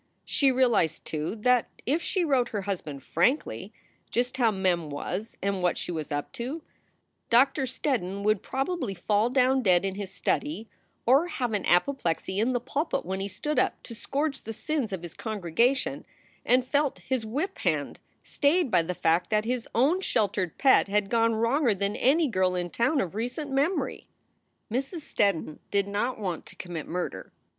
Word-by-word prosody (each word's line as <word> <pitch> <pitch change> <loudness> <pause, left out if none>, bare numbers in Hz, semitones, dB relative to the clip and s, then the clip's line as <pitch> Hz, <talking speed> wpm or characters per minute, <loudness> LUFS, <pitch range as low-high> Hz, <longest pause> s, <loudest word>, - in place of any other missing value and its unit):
She 275 -2 +3
realized, 245 - +2
too, 155 +5 -3
that 250 0 +3 0.2
if 295 +7 +1
she 365 0 0
wrote 260 -5 +2
her 205 -3 -3
husband 155 -8 -4
frankly 250 - 0 0.4
just 250 +2 -1
how 240 -3 +4
Mem 185 -6 0
was 200 +9 -4
and 195 -1 0
what 180 -1 +1
she - - -4
was 155 -2 -4
up 145 0 -3
to, 275 +7 -5 0.7
Doctor 265 +3 +4
Steddon 200 -7 -2
would 215 -1 +2
probably 270 - -2
fall 210 +5 +1
down 260 +1 +3
dead 185 -4 +3
in 195 - -1
his 200 -1 -5
study, 230 +2 -2 0.4
or 275 +8 +5
have 250 -9 -2
an 205 - -1
apoplexy 190 -3 +1
in 230 +4 +2
the 245 - +1
pulpit 285 +6 -2
when 190 +2 -3
he 195 - -2
stood 295 +10 -2
up - - +2
to 235 - -7
scourge 275 +5 -2
the 225 - -6
sins 285 -2 -2
of 185 -3 -4
his 170 -2 -7
congregation 220 +5 0 0.4
and 250 +1 +3
felt 285 +1 +1
his 260 -3 -1
whip 290 - -3
hand - - -1 0.2
stayed 295 -1 +1
by 170 - +5
the 180 +2 -4
fact 170 +2 +2
that 215 0 +1
his 245 0 -2
own 290 +11 +3
sheltered 195 - 0
pet 270 -6 +5
had 200 0 0
gone 230 -1 +3
wronger 230 +1 +2
than 200 +2 -1
any 305 +5 +3
girl 185 -5 +1
in 175 -1 -2
town 260 +5 +2
of 185 -3 -2
recent 245 +7 -3
memory. 290 +7 0 0.6
Mrs. 270 - -2
Steddon 195 - 0
did 200 -1 +1
not 210 +5 -1
want 185 -6 -4
to - - -11
commit 175 -4 -6
murder. 170 - -4
225 Hz, 175 wpm, -27 LUFS, 190-270 Hz, 0.7 s, or